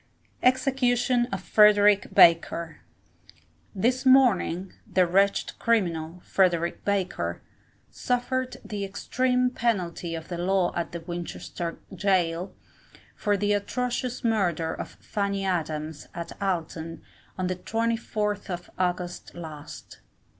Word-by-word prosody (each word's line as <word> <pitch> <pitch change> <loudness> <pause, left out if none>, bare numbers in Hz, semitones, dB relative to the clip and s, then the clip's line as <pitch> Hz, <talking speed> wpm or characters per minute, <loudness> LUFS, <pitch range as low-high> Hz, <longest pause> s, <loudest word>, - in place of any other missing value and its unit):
EXECUTION 250 -1 +2
OF 195 - -3
FREDERICK 210 -1 +5
BAKER. 165 -1 +4 1.0
This 245 +6 +1
morning, 230 -9 +4 0.2
the 185 - +4
wretched 195 +3 +2
criminal, 175 -7 0
Frederick 175 -3 +1
Baker, 195 -3 -1 0.5
suffered 255 +1 -1
the 205 -2 -4
extreme 250 +5 0
penalty 180 -8 -1
of 160 0 -7
the 175 -1 -5
law 185 0 +1
at 170 0 -4
Winchester 175 -1 -5 0.2
Gaol, 180 -2 0 0.6
for 205 -1 +1
the 205 +1 +1
atrocious 250 +4 -2
murder 175 -8 +1
of - - -6
Fanny 200 -2 -2
Adams, 155 -4 -3
at 170 0 -5
Alton, 165 -3 -3 0.3
on 185 - -1
the 185 0 -1
24th 220 -1 -2
of 175 -1 -5
August 180 -1 -2
last. 155 -3 -9
195 Hz, 105 wpm, -26 LUFS, 170-230 Hz, 1.0 s, FREDERICK